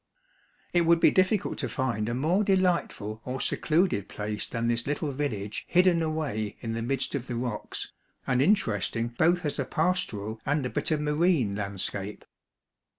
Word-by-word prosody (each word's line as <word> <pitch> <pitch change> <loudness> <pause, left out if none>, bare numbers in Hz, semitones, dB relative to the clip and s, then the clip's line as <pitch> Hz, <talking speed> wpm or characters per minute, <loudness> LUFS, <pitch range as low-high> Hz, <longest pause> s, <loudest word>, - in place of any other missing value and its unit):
It 175 - +4
would 170 0 +5
be 170 - +6
difficult 185 +2 +2
to - - -2
find 115 -5 -1
a 120 - -1
more 165 +10 +2
delightful 180 - +1
or 130 +1 -4
secluded 160 - +1
place 105 0 -4
than 115 0 -2
this 120 +1 0
little 145 +1 -1
village 115 -8 -3
hidden 180 -1 +4
away 145 -10 -2
in 115 -1 -3
the 115 - -2
midst 130 +3 -1
of 135 -3 -3
the 120 - -3
rocks, 120 -3 -4 0.3
and 125 -1 +2
interesting 115 - +1
both 165 +8 +2
as 145 - -2
a - - +2
pastoral 115 - -1
and 145 -1 0
a 125 - -3
bit - - -1
of 155 -2 +1
marine 150 - +2
landscape. 100 0 -4
130 Hz, 165 wpm, -28 LUFS, 110-165 Hz, 0.3 s, be